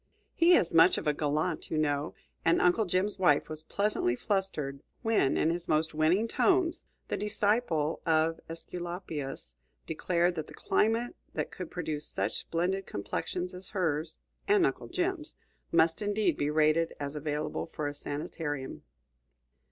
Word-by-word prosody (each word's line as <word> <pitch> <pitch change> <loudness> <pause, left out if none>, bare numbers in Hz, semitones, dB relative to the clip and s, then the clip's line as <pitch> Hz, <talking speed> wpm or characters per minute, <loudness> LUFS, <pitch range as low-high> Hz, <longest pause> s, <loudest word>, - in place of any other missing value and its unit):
He 345 +1 +6
is 175 - +2
much 165 +2 +6
of - - -4
a 150 - +3
gallant, 155 +3 -1
you 155 - -1
know; 145 -1 0 0.3
and 165 - +4
Uncle 180 +5 +3
Jim's 185 +3 0
wife 150 -6 +4
was 155 0 -5
pleasantly 200 - 0
flustered 150 -6 -2 0.2
when, 225 - +2
in 160 - +3
his 170 0 -3
most 155 +1 +2
winning 165 +8 +3
tones, 360 - +2 0.3
the - - 0
disciple 205 -7 0
of 160 0 +2
Æsculapius 165 - -6 0.3
declared 175 +2 +1
that 160 -3 -4
the - - -11
climate 225 +3 +1 0.2
that - - -2
could 180 -3 -6
produce 155 -4 -4
such - - -2
splendid 185 +3 -1
complexions 175 - -3
as 180 +1 -9
hers 160 -2 -1 0.3
and 400 -3 +5
Uncle - - -2
Jim's 360 -3 -2 0.4
must 165 +3 +3
indeed 205 -5 +1
be 145 - 0
rated 155 +2 +2
as 145 0 -4
available 150 0 -2
for 150 - -4
a 145 - -3
sanitarium. 145 -1 -4
165 Hz, 150 wpm, -30 LUFS, 150-195 Hz, 0.4 s, He